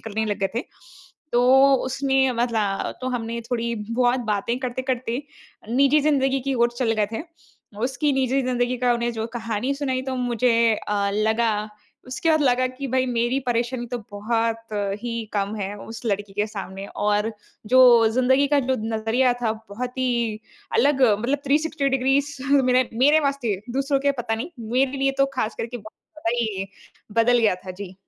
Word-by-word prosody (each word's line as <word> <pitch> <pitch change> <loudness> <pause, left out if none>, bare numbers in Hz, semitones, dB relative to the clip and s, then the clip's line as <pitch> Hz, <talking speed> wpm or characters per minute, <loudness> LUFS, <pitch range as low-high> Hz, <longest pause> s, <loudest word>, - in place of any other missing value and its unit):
करने 220 0 -3
लग 205 -1 -2
गए 195 - +1
थे। 235 - 0 0.7
तो 265 +3 +5
उसने 265 0 +1
मतलब 225 -4 -1
तो 255 - -1
हमने 235 -1 -3
थोड़ी 235 -1 -1 0.2
बहुत 245 +1 +2
बातें 210 +4 -1
करते-करते, 255 0 -2 0.5
निजी 275 +5 +4
ज़िंदगी 270 -2 +2
की 270 +1 -2
ओर 235 -1 +3
चले 230 -3 +1
गए 210 -1 +2
थे। 225 - -3 0.6
उसकी 275 +3 0
निजी 265 0 +1
ज़िंदगी 250 0 0
का 245 -1 +2
उन्हें 235 0 -1
जो 225 -1 -3
कहानी 230 +3 -2
सुनाई 265 -2 -2
तो 260 0 -3
मुझे 235 -2 +2
अ, 200 -1 0
लगा, 215 0 +1 0.4
उसके 260 +6 0
बाद 315 -1 +3
लगा 255 -1 +3
कि 255 +2 -6
भई 260 +1 +1
मेरी 240 +2 0
परेशानी 240 +1 -1
तो 245 +1 -4
बहुत 225 +2 -1 0.3
ही 240 - -3 0.2
कम 200 0 -1
है 200 0 -4
उस 225 +3 -9
लड़की 205 -1 -2
के 210 +1 0
सामने 195 -2 -7
और 210 +2 0 0.4
जो 260 - +7 0.3
ज़िंदगी 260 +3 +3
का 290 0 +3
जो 260 - +3 0.2
नज़रिया 230 +4 +2
था 225 -2 +1 0.2
बहुत 250 +5 -5
ही 235 -4 0 0.3
अलग 290 - +3 0.2
मतलब 265 +6 0
360 295 0 +1
डिग्रीज 270 +2 +1 0.2
मेरे 255 -2 +4
मेरे 290 +6 +5
वास्ते, 275 -9 -1
दूसरों 275 +2 0
के 280 0 +2
पता 225 -2 -1
नहीं 270 +10 -5 0.2
मेरे 265 +2 +2
लिए 270 0 +2
तो 275 - +5
खास 225 -3 -1
करके 235 +2 -4
बहुत 215 -1 -12 0.4
ज़्यादा - - -1
ही 205 -5 -2 0.5
बदल 240 +2 +4
गया 220 -5 +3
था। - - -4
जी। 190 0 -9
245 Hz, 170 wpm, -23 LUFS, 225-265 Hz, 0.7 s, जो